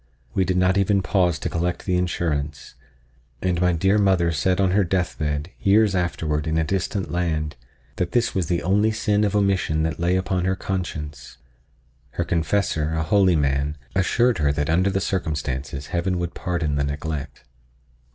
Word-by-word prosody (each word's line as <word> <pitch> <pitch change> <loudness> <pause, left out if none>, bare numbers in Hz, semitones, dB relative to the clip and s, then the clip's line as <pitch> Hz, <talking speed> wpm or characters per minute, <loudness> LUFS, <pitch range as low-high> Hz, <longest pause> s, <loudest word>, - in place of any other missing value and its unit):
We 95 - +2
did 90 0 0
not 90 +1 +3
even 100 0 +2
pause 90 -5 +2
to - - -4
collect 85 +1 -2
the 90 - +1
insurance, 75 -5 -2 0.7
and 90 0 0
my 90 0 +4
dear 95 +5 +2
mother 95 -4 +3
said 90 +4 +1
on 95 -2 +3
her 100 +2 +3
death 90 0 -1
bed, 75 +2 -2
years 105 0 +4
afterward 80 -4 -1
in 80 0 0
a 80 - +2
distant 95 +3 -2
land, 80 -4 -1 0.4
that 90 -1 -1
this 120 -1 +1
was 90 -4 -1
the 85 -1 -1
only 105 +4 +3
sin 105 -1 +1
of 105 -1 0
omission 95 -6 +1
that 80 +1 -2
lay 90 +2 +2
upon 95 -1 0
her 95 0 +1
conscience. 90 -6 -5 0.8
Her 85 - -1
confessor, 85 -2 0
a 80 - 0
holy 95 +1 +3
man, 70 0 0 0.2
assured 115 +3 +2
her 75 -2 +2
that 75 +2 -1
under 90 +4 +3
the 95 0 0
circumstances 70 -7 -3
Heaven 90 +1 0
would 85 -1 -3
pardon 80 -5 -2
the 70 - +1
neglect. 70 0 -4
90 Hz, 175 wpm, -23 LUFS, 80-95 Hz, 0.8 s, my